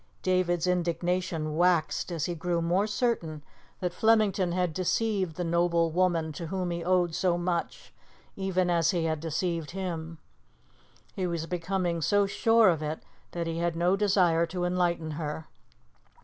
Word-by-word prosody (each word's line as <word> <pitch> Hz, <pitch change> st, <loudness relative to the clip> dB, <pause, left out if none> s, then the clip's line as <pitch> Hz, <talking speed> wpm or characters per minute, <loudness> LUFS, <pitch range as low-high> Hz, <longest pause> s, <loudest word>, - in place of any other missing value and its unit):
David's 180 Hz, -2 st, +1 dB
indignation 175 Hz, -2 st, -1 dB
waxed 175 Hz, 0 st, +1 dB
as 165 Hz, -4 st, -2 dB
he 175 Hz, -, -2 dB
grew 170 Hz, +1 st, -1 dB
more 175 Hz, +5 st, +1 dB
certain 205 Hz, -, -1 dB, 0.4 s
that 180 Hz, -1 st, -1 dB
Flemington 210 Hz, -4 st, +2 dB
had 180 Hz, -2 st, 0 dB
deceived 190 Hz, -1 st, 0 dB
the 180 Hz, -, -3 dB
noble 170 Hz, -1 st, +2 dB
woman 170 Hz, -2 st, +1 dB
to 165 Hz, +3 st, -6 dB
whom 180 Hz, 0 st, -2 dB
he 170 Hz, 0 st, -3 dB
owed 180 Hz, -1 st, +2 dB
so 175 Hz, 0 st, +1 dB
much, 175 Hz, -1 st, -3 dB, 0.4 s
even 185 Hz, -2 st, 0 dB
as 165 Hz, -2 st, +2 dB
he 170 Hz, -2 st, 0 dB
had 160 Hz, -1 st, -1 dB
deceived 165 Hz, 0 st, -2 dB
him. 165 Hz, -3 st, -4 dB, 1.0 s
He 185 Hz, -2 st, -1 dB
was 170 Hz, -2 st, -2 dB
becoming 175 Hz, 0 st, -2 dB
so 205 Hz, +5 st, +3 dB
sure 225 Hz, +1 st, +4 dB
of 165 Hz, -3 st, 0 dB
it 155 Hz, +1 st, -4 dB, 0.3 s
that 170 Hz, -1 st, -2 dB
he 165 Hz, 0 st, -3 dB
had 170 Hz, -1 st, 0 dB
no 175 Hz, +3 st, +2 dB
desire 185 Hz, -5 st, +3 dB
to 175 Hz, +1 st, -3 dB
enlighten 175 Hz, -3 st, 0 dB
her. 150 Hz, 0 st, -4 dB
175 Hz, 155 wpm, -28 LUFS, 165-185 Hz, 1.0 s, sure